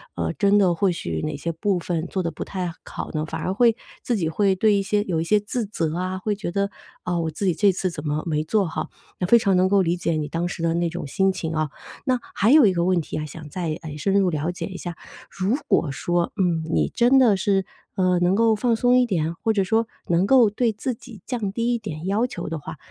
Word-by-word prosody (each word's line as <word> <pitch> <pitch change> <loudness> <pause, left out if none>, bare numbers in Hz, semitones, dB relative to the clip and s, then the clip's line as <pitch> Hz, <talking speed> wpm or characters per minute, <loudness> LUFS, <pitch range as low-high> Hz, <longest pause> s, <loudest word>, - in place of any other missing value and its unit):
呃， - - -2
真 200 0 +3
的 190 -4 +4
或 190 +2 +2
许 85 - -3
哪 - - -2
些 170 +4 -3
部 185 +3 0
分 170 -1 -2
做 190 - -2
得 170 -2 -2
不 - - -5
太 180 -3 -4
好 - - -6
呢， 155 -1 -1
反 160 0 -5
而 185 - -1
会 230 +2 +4 0.3
自 240 - 0
己 170 -6 0
会 195 +3 +2
对 215 +3 +3
一 200 - +2
些 205 +1 +1
有 180 -6 -1
一 - - 0
些 210 +5 +3
自 220 +3 -3
责 165 -6 -2
啊， 185 +1 -2
会 205 +2 -2
觉 200 -4 -4
得： 200 +2 0 0.4
“哦， 175 -1 0
我 160 -1 -2
自 175 +6 -4
己 185 - +3
这 200 +3 +3
次 185 0 -1
怎 165 - -7
么 150 +1 -1
没 155 -2 0
做 195 +4 +1
好。” 160 - -4 0.3
那 180 - 0
非 235 +5 +7
常 195 -4 +2
能 185 +1 +4
够 200 0 +4
理 170 -1 +1
解 170 -1 -1
你 155 -2 -1
当 170 +3 -2
时 175 - -6
的 165 0 +2
那 170 0 +1
种 175 -2 -5
心 190 +6 +2
情 165 -4 -4
哦。 155 -1 0 0.4
那， 255 -2 +1 0.2
还 215 +6 +3
有 300 -3 +8
一 195 - +4
个 170 -1 0
问 185 -1 +3
题 - - -6
啊， 155 - -3
想 155 0 -10
再 165 -2 -3
哎 155 -3 -7
深 195 +6 0
入 190 -2 +3
了 155 +1 -1
解 175 - -5
一 185 - -7
下， 175 -2 -6 0.3
如 195 +6 0
果 145 - +2
说， 175 +5 -1
嗯， 175 -4 +1
你 - - +2
真 245 +3 +4
的 235 -6 +5
是， 195 0 +1 0.3
呃， 185 -1 +2
能 175 +2 +3
够 225 0 +4
放 235 +2 +1
松 245 +2 +3
一 250 - +4
点， 165 -6 -1
或 225 - +3
者 200 -2 +2
说 225 +4 +1 0.2
能 170 +2 +2
够 240 -1 +6
对 230 +2 +1
自 245 +4 -3
己 225 -3 -13
降 230 -6 -2
低 235 +3 0
一 - - +1
点 180 -7 -7
要 210 +5 +1
求 180 -8 -6
的 165 - -4
话， 155 +2 -8
185 Hz, 285 characters per minute, -23 LUFS, 165-210 Hz, 0.4 s, 有